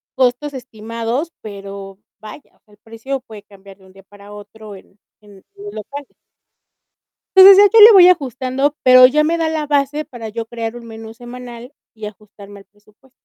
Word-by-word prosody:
costos 260 +3 -2
estimados, 230 +4 -6
pero 195 -2 -11 0.2
vaya, 215 +6 -14
o - - -37
sea, 210 - -32
el - - -23
precio 230 +5 -7
puede 220 -5 -15
cambiar 200 -1 -18
de 190 - -23
un 190 - -21
día 195 0 -19
para 200 +1 -18
otro 210 0 -13
en 195 +1 -20 0.2
en 205 -2 -19 0.2
en 400 - -15
los 410 - -10
locales. 280 +6 -11 1.2
Entonces 380 +1 +9
ya 405 - +3
yo - - +8
le 450 - +8
voy 365 -3 +7
ajustando, 270 -2 -2
pero 255 0 +6
ya 300 +4 0
me 335 +2 -2
da 325 -1 -2
la 315 -1 -4
base 290 +1 -2
para 235 -5 -11
yo 225 +1 -7
crear 230 0 -7
un 240 - -12
menú 225 0 -12
semanal 245 +1 -12 0.2
y 220 -1 -12
ajustarme 205 -1 -13
al 195 - -21
presupuesto. 210 +5 -30
230 Hz, 190 wpm, -16 LUFS, 210-275 Hz, 1.2 s, Entonces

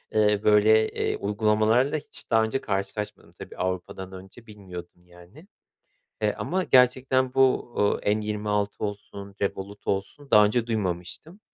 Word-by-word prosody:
ııı, 105 -1 +3
böyle, 110 +1 +5
eee, - - -2
uygulamalarla 110 +6 +2
hiç 150 - -7
daha 110 -1 +4
önce 110 +4 -2
karşılaşmadım 100 +1 -4
tabii. - - -11
Avrupa'dan 95 +1 -4
önce 95 +5 -12
bilmiyordum, 90 -4 -11
yani. 90 - -17 0.7
E, - - +1
ama 185 0 -2
gerçekten 130 0 +3
bu, 130 -2 +2
ııı, 105 - +2
N26 105 -1 -1
olsun, 100 -1 -6
Revolut 100 +1 -4
olsun 100 +9 -3
daha 105 0 +7
önce 115 +3 0
duymamıştım. 100 - -4
105 Hz, 130 wpm, -25 LUFS, 100-120 Hz, 0.7 s, daha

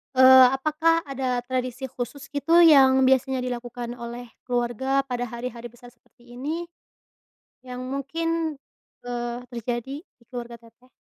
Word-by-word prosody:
eee, 260 0 +9
apakah 320 +4 +1
ada 260 -3 -2
tradisi 255 0 -3
khusus 260 +3 -7
gitu 330 +4 +4
yang 265 -4 +6
biasanya 265 0 +2
dilakukan 245 -1 -5
oleh 235 0 -8 0.2
keluarga 250 +2 0
pada 245 -2 -3
hari-hari 235 0 -6
besar 240 +1 -16
seperti 240 0 -21
ini, 315 +6 -3 1.0
yang 250 -1 -7
mungkin, 320 +4 -2 0.5
eee, 240 -1 -4
terjadi 240 +2 -4
di 245 - -31
keluarga 240 -2 -7
Teteh? 235 +2 -22
255 Hz, 125 wpm, -24 LUFS, 240-275 Hz, 1.0 s, eee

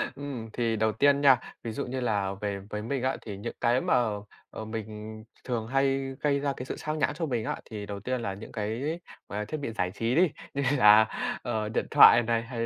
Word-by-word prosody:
Ừm, 135 -6 -6
thì 115 -2 0
đầu 110 0 +2
tiên 140 +5 +3
nha, 135 -3 +6 0.2
ví 115 - -3
dụ - - -3
như 130 +1 -4
là 100 -5 0
về 100 -1 -2
với 105 - -4
mình 125 +4 -3
á 130 - 0
thì 105 -3 -6
những 110 +4 -6
cái 120 +2 +3
mà, - - +1 0.6
ờ, 110 - -7
mình 110 0 -7
th 110 - -23
thường 115 -3 -2
hay 135 +1 0
gây 140 -1 +2
ra 140 0 -1
cái 125 - -5
sự - - -5
sao 155 0 -3
nhãng 155 - +1
cho 165 - -2
mình 120 -7 -2
á - - -2
thì 105 -2 -7
đầu 100 -1 -6
tiên 125 +4 -2
là 100 -4 -3
những 100 +3 -10
cái, 120 +10 -3 0.3
à, 105 +1 -4
thiết 155 - -3
bị 140 -5 -4
giải 90 -5 -1
trí 115 +2 -1
đi, 175 +2 +5 0.2
như 140 - -1
là, 105 -2 +8 0.4
ờ, 110 -3 -2
điện 110 - -1
thoại 120 - +8
này, 115 0 +1
hay 115 -1 -3
115 Hz, 235 wpm, -28 LUFS, 110-135 Hz, 0.6 s, là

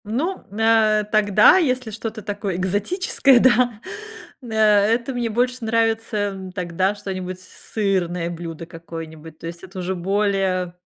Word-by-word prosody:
Ну, 285 - -2
нэ 215 0 +3
тогда, 210 - +6
если 255 -9 0
что-то 220 0 -6
такое 205 -2 -3
экзотическое, 240 - +2
да, 245 -2 +3 0.6
э, 250 - -11
это 220 +4 +3
мне 240 -2 -2
больше 250 +3 0
нравится, 225 0 0
м, 195 -2 -3
тогда 185 +2 -1
что-нибудь 185 -2 -6
сырное 185 -3 -2
блюдо 165 -1 -7
какое-нибудь, 165 -1 -10
то 165 - -11
есть 170 +1 -7
это 190 +1 -11
уже 185 +1 -2
более 190 -1 0
205 Hz, 130 wpm, -21 LUFS, 185-225 Hz, 0.6 s, тогда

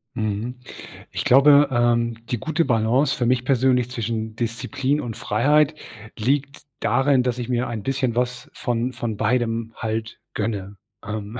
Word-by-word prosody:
Mhm, 110 +2 -2 0.6
ich - - -3
glaube, 140 +2 +6
ähm, 120 -1 +1
die 120 - -2
gute 160 +6 0
Balance 125 +4 +2
für 120 - -1
mich 125 0 +1
persönlich 125 -2 +2
zwischen 110 -2 -3
Disziplin 130 +5 -1
und 115 -6 -5
Freiheit 145 +8 +2 0.5
liegt 140 +4 0 0.2
darin, 130 +3 +3
dass 125 -1 -1
ich 120 -1 -4
mir 125 0 0
ein 115 -3 -4
bisschen 130 0 0
was 125 +1 -2
von 120 +1 -1
von 115 -3 -4
beidem 115 +1 0
halt 110 +1 -4
gönne. 105 -2 -3 0.3
Ähm, 110 +3 -5
120 Hz, 145 wpm, -23 LUFS, 115-130 Hz, 0.6 s, glaube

